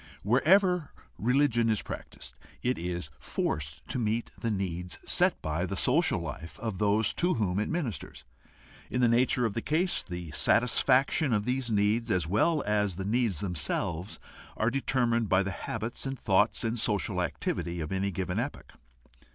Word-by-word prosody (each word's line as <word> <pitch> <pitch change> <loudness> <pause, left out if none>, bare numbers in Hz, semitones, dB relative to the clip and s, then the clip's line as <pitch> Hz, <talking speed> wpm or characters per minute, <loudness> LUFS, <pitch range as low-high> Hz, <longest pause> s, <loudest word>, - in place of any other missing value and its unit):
Wherever 175 - +3 0.3
religion 120 -1 +2
is 110 -2 +1
practiced, - - -8 0.3
it 125 +1 0
is 85 -3 -4
forced 75 0 -3
to 130 - -2
meet 115 +1 -1
the 115 - -3
needs 90 -4 -3
set - - +3
by 80 +4 -1
the 95 - -3
social 135 - +2
life 80 0 -7
of 110 -4 -4
those 105 +1 +2
to 180 +1 +1
whom 100 -4 0
it 105 - -1
ministers. 155 - -4 0.7
In 125 - -1
the 120 - +5
nature 120 +1 +3
of 110 - -1
the 115 - -2
case, 170 +7 +1
the 85 -3 -7
satisfaction 130 - +3
of 105 -1 +1
these 125 0 -1
needs, 110 +2 +1
as 90 -6 +2
well 140 - +2
as 105 -3 +1
the 95 +1 -4
needs 110 -6 +1
themselves, 90 0 -2 0.4
are 110 +2 +1
determined 120 -4 +1
by 95 +1 +4
the 100 - -3
habits 115 +7 -5
and 135 0 -4
thought 105 +2 +2
and 115 +1 -1
social 100 -3 0
activity 85 0 -2
of 80 -1 -4
any 95 +1 0
given 95 +1 -2
epoch. 135 +5 -5
110 Hz, 165 wpm, -29 LUFS, 95-125 Hz, 0.7 s, the